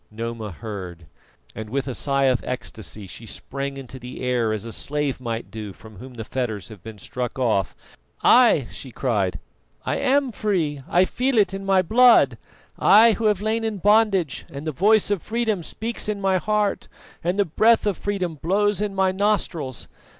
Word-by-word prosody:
Noma 115 0 -5
heard, 90 -4 -8 0.5
and 110 -1 -7
with 135 +3 -2
a 130 - -3
sigh 140 +2 0
of 130 -2 +2
ecstasy 110 -4 -5
she 115 +5 -10
sprang 140 +4 -5
into 130 -1 -9
the 125 +1 -8
air 125 -3 +1
as 110 0 -3
a 115 - -6
slave 145 -2 -2
might 115 -4 -4
do 105 -2 -7
from 110 0 -15
whom 125 +4 -11
the 115 - -5
fetters 110 -4 -4
have 105 -5 -12
been 110 +2 -10
struck 125 +5 -5
off. 110 -8 0 0.5
"Ay," 235 - +6
she 135 - -9
cried, 110 -7 -1 0.5
"I - - 0
am 275 -1 +2
free! 175 -10 -1
I 180 +2 +4
feel 255 +5 -1
it 205 -2 +3
in 195 0 -6
my 190 -1 +4
blood, 240 +6 +5 0.4
I 225 +3 +7
who 225 +1 -2
have 210 -2 +2
lain 220 +1 0
in 220 -2 -2
bondage, 205 -6 +2
and 140 +2 -7
the 155 - -1
voice 205 +7 +3
of 200 -5 0
freedom 220 -4 -1
speaks 220 +7 -4
in 210 -1 -2
my 195 -1 +2
heart 210 0 0 0.4
and 175 +3 0
the 205 - +3
breath 220 +8 +3
of 205 -2 +1
freedom 185 -4 -2
blows 205 +3 +1
in 205 -2 -2
my 190 -1 +2
nostrils. 185 - -1
155 Hz, 185 wpm, -23 LUFS, -, 0.5 s, I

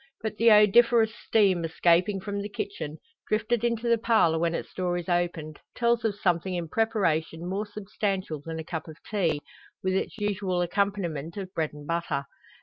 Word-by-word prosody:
But 220 -1 -3
the 230 +1 +5
odoriferous 220 +2 +6
steam 195 -7 +2
escaping 175 +4 +2
from 200 +1 -3
the 205 - -5
kitchen, 405 - -5 0.3
drifted 220 +2 0
into 235 0 0
the 235 -1 +3
parlour 215 -9 +3
when 170 0 +1
its - - -5
door 180 -1 -1
is 175 - -5
opened, 175 -4 -1 0.2
tells 235 -1 +2
of 220 -3 0
something 180 -2 0
in 170 -2 -3
preparation 175 -7 0
more 200 +3 -2
substantial 195 -5 -3
than 165 +1 -5
a 160 - -4
cup 160 0 -5
of 160 -1 -10
tea, 170 -8 0 0.4
with 185 0 +1
its 190 - -2
usual 195 -4 -1
accompaniment 175 -4 -1
of 190 -2 -6
bread 160 -2 0
and 150 0 -10
butter. 160 -4 -2
190 Hz, 175 wpm, -27 LUFS, 170-215 Hz, 0.4 s, odoriferous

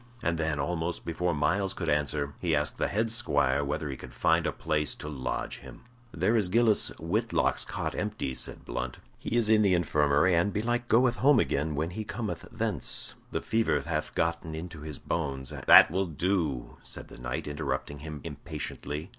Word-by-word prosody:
And 85 -1 0
then, 80 -2 0
almost 85 +2 -2
before 85 0 -1
Myles 95 +7 +1
could - - -4
answer, 75 -1 0
he 85 -3 +1
asked 75 0 0
the - - +2
head 110 +2 0
squire 70 - +2
whether 75 +2 -2
he 70 - -4
could 65 -1 -11
find - - +3
a - - +1
place 75 -1 0
to - - -8
lodge 65 -4 -3
him. - - -12 0.3
"There 115 - +1
is 105 -5 +2
Gillis 110 +1 +4
Whitlock's 105 +9 +1
cot - - -3
empty," 65 - -3
said - - -4
Blunt. 60 0 -4 0.2
"He 120 - -1
is 115 -3 +2
in 110 0 +5
the 100 -3 +4
infirmary, 75 0 +3
and 85 +4 +3
belike 120 +4 -1
goeth 120 +1 +4
home 140 -1 +5
again 75 -3 0
when 80 +4 -1
he 110 +4 -4
cometh 110 0 -5
thence. 105 - -2 0.2
The - - -2
fever 115 0 +1
hath 80 -2 -3
gotten 85 -1 -1
into 80 -1 -7
his 75 -2 -6
bones, 70 -5 -3
and - - -7
" - - -15
"That - - +10
will 95 +2 0
do," 80 -7 -1
said - - -8
the - - -12
knight, 60 +3 -4
interrupting 70 -1 -3
him 75 0 -7
impatiently. 75 +1 -5
80 Hz, 190 wpm, -29 LUFS, 75-100 Hz, 0.3 s, That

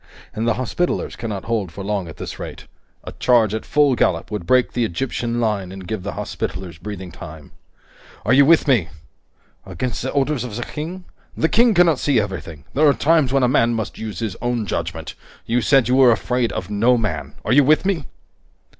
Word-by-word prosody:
And 110 +2 -2
the 115 - +2
Hospitallers 130 +8 -2
cannot 105 -5 -5
hold 110 -7 -2
for 100 +4 -7
long 100 -3 -2
at 80 - -10
this - - -7
rate. - - -8 0.4
A - - -7
charge 115 -4 +2
at 110 - -4
full 145 -2 +3
gallop 95 -6 0
would 105 -5 -4
break 130 -1 +3
the 120 - 0
Egyptian 115 +3 -2
line 105 -5 -1
and 95 -1 -9
give 110 0 -3
the 100 - -5
Hospitallers 90 -2 -5
breathing 95 -1 -7
time. 75 -1 -11 0.7
Are 110 - +3
you 140 +2 +7
with 160 +2 +4
me?" 115 - +3 0.7
"Against 125 -2 -4
the 130 - -2
orders 140 -1 0
of 120 -4 -6
the 120 - -3
King?" 175 +7 -6 0.3
"The 160 - +2
King 230 -1 +4
cannot 170 -5 +4
see 140 -5 +2
everything! 90 -7 -5
There 150 +2 +4
are 140 - +3
times 155 -4 +3
when 135 -1 +2
a - - +5
man 120 -2 +2
must 110 -1 -4
use 110 -5 -5
his 105 -3 -3
own 120 -2 -1
judgment! - - -4 0.3
You 120 +2 +1
said 130 0 +4
you 125 +1 +3
were 130 -3 +7
afraid 120 +2 0
of 95 +3 -5
no 115 +5 +3
man. 110 -3 -3
Are - - +2
you 145 +2 +6
with 155 +6 +3
me?" 180 -8 0
120 Hz, 205 wpm, -21 LUFS, 100-135 Hz, 0.7 s, you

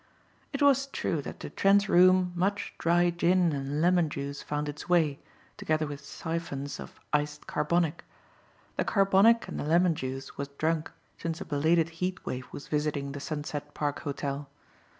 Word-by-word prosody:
It 280 -1 -1
was 275 -1 +4
true - - -2
that - - -8
to - - -6
Trent's 200 +1 +4
room 185 0 +5
much 195 +4 -1
dry 175 +1 +3
gin 175 -1 +3
and 140 +2 -2
lemon 175 -2 +3
juice 140 0 -5
found 150 0 -3
its 145 +3 -7
way, 160 -5 +3 0.4
together 155 0 0
with 145 -1 -7
siphons 145 -2 -4
of - - -10
iced 150 0 0
carbonic. 160 +1 0 0.7
The - - +2
carbonic 200 +3 +4
and - - -5
the - - -2
lemon 170 +3 +4
juice 135 -2 -6
was 140 - -2
drunk 160 0 0 0.3
since 165 0 -3
a 195 - -6
belated 160 +3 +2
heat 185 +1 -2
wave 125 0 -4
was 145 - -8
visiting 150 -2 -1
the 140 - -6
Sunset 145 0 -5
Park 145 -1 -1
Hotel. 140 -1 -4
155 Hz, 165 wpm, -29 LUFS, 145-180 Hz, 0.7 s, room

